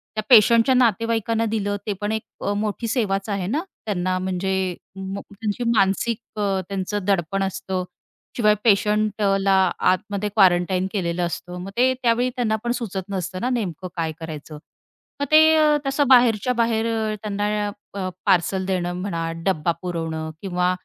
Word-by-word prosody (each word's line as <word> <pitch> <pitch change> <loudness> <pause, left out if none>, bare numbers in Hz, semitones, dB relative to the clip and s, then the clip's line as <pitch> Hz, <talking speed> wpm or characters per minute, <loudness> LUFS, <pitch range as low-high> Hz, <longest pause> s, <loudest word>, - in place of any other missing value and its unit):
त्या 215 - -2
पेशंटच्या 230 +1 +6
नातेवाईकांना 230 -1 +1
दिलं 205 -2 -1
ते 210 - 0
पण 205 +1 -1
एक 220 0 -2 0.2
अ, 205 - -1
मोठी 210 +2 -2
सेवाच 210 -4 -1
आहे 195 -3 -2
ना. 290 - -1 0.2
त्यांना 185 -3 -1
म्हणजे 190 0 -1 0.2
त्यांची 200 +3 -5
म 235 - +1
मानसिक 205 +3 +1 0.2
अ, 195 -2 0
त्यांचं 195 +1 -2
दडपण 195 0 0
असतं, 190 -1 -3 0.5
शिवाय 210 -3 +4
पेशंटला 205 -2 +2 0.3
आतमध्ये 200 +2 0
क्वारंटाईन 185 -2 +3
केलेलं 175 -3 -1
असतं, 175 +1 -5
मग 190 - -6
ते 255 +1 +4
त्यावेळी 240 +1 +2
त्यांना 230 -3 0
पण 240 - 0
सुचत 200 -5 -5
नसतं 185 -1 -4
ना 250 - 0
नेमकं 190 - -3
काय 165 -2 -1
करायचं? 155 -1 -8 0.7
मग - - +2
ते 310 -1 +6
तसं 280 +1 +1
बाहेरच्या 245 -2 +5
बाहेर 230 -1 +1
अ, 220 -1 -1
त्यांना 210 0 -1 0.6
पार्सल 190 0 +2
देणं 180 -2 -1
म्हणा, 165 -4 -3
डब्बा 170 -3 +1
पुरवणं 165 -3 -3
किंवा 180 -2 0
200 Hz, 145 wpm, -22 LUFS, 185-225 Hz, 0.7 s, पेशंटच्या